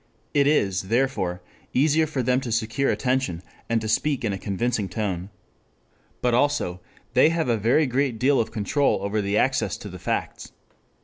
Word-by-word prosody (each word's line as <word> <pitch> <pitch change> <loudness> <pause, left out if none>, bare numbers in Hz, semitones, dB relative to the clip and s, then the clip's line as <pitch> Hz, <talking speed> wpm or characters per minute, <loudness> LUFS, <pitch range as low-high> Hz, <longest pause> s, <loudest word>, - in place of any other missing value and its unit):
It 140 -1 +3
is, 95 -10 +1
therefore, 115 -8 0 0.3
easier 155 +4 +3
for 140 -4 -2
them 125 +2 +2
to 120 - -5
secure 115 +4 0
attention 125 -10 -1 0.3
and 115 -1 +2
to 110 - -4
speak 135 +3 0
in 105 - 0
a 95 - -4
convincing 105 0 -1
tone. 95 -2 -3 0.9
But 125 -1 +2
also 120 -9 +1 0.3
they 155 - +6
have 165 -5 -1
a 120 - +3
very 115 +9 +3
great 130 -2 0
deal 135 +4 +3
of 115 - 0
control 110 +1 0
over 105 +1 0
the 100 +1 0
access 130 +2 +1
to 105 - -9
the 90 0 -9
facts. - - -3
120 Hz, 175 wpm, -24 LUFS, 100-135 Hz, 0.9 s, they